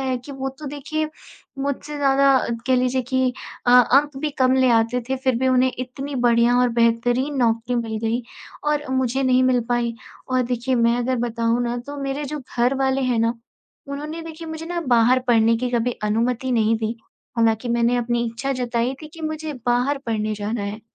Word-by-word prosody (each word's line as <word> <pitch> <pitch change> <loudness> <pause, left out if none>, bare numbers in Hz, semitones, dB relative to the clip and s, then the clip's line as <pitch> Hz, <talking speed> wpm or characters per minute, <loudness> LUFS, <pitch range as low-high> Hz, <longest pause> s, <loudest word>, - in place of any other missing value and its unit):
है 260 -1 -1
कि 265 +4 -10
वो 270 0 -3
तो 305 - -8
देखिए 305 +2 -3 0.5
मुझसे 280 +2 -3
ज़्यादा 275 -1 +4 0.3
कह 260 - +3
लीजिए 255 +1 +1
कि 260 0 0 0.3
अ, - - +4
अंक 270 +3 +5
भी 305 - -1
कम 260 0 +4
ले 260 -1 +4
आते 230 +2 +2
थे 265 - 0
फिर 260 -2 0
भी 260 +1 +1
उन्हें 255 0 +3
इतनी 270 +3 -5
बढ़िया 235 +1 +4
और 250 0 +4
बेहतरीन 240 +5 +2
नौकरी 235 0 +1
मिल 225 -2 -2
गई 235 +2 0 0.4
और 295 0 0
मुझे 260 0 0
नहीं 255 -1 +3
मिल 255 -1 +3
पाई 240 -1 0 0.3
और 255 0 +2
देखिए 245 +1 -1
मैं 235 0 +3
अगर 255 +1 0
बताऊँ 230 +1 0
ना 240 0 -2
तो 285 0 -6
मेरे 275 +2 -3
जो 300 +2 -4
घर 250 +1 0
वाले 265 0 +1
हैं 250 -3 +1
ना 230 +1 +2 0.5
उन्होंने 300 +4 -5
देखिए 325 0 -8
मुझे 320 0 -6
ना 345 0 -2
बाहर 245 +1 +5
पढ़ने 230 -1 +4
की 250 +2 -2
कभी 245 0 +1
अनुमति 235 +4 0
नहीं 225 -1 +2
दी, 225 +1 -2 0.4
हालाँकि 225 +1 +2
मैंने 235 +1 +2
अपनी 240 0 0
इच्छा 250 +4 -3
जताई 245 0 -1
थी 310 - -8
कि 330 - -11
मुझे 310 0 -3
बाहर 250 +4 +2
पढ़ने 215 -1 -1
जाना 210 +1 -3
है। 205 +2 -5
250 Hz, 195 wpm, -22 LUFS, 235-270 Hz, 0.5 s, अंक